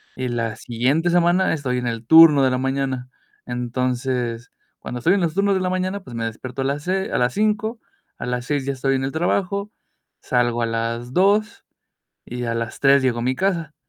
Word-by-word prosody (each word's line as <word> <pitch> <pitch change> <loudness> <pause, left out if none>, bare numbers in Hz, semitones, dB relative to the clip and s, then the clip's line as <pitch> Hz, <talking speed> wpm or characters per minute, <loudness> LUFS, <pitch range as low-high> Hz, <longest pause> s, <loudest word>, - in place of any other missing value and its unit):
Y 130 0 -3
la 115 -2 -2
siguiente 125 +9 0
semana 175 +2 +3
estoy 130 -5 -2
en 125 - -3
el 115 -1 -4
turno 160 0 +8
de 130 - +3
la 130 - 0
mañana. 130 -1 -2 0.4
Entonces, 125 -1 -2 0.3
cuando 125 - -6
estoy 170 +10 +3
en 200 - 0
los 165 -3 0
turnos 200 +2 +2
de 190 - 0
la 185 - 0
mañana, 185 +2 -2
pues, 125 - -10
me 115 0 -2
despierto 125 +4 -6
a - - -1
las 140 +2 -2
se 190 +2 -1
a - - 0
las 125 0 +1
5:00 215 +2 0 0.4
a - - -4
las 125 0 -3
6:00 145 0 -1
ya 140 - -1
estoy 135 +1 0
en 135 - -1
el 135 - -2
trabajo, 200 +5 -1 0.5
salgo 120 -1 0
a - - +2
las 115 +2 -3
2, 205 +5 +2 0.6
y 125 0 -6
a 115 0 -2
las 115 -1 -4
3:00 140 0 +5
llego 120 -2 +1
a - - -3
mi 130 +2 0
casa. 170 -5 -1
135 Hz, 210 wpm, -21 LUFS, 125-175 Hz, 0.6 s, turno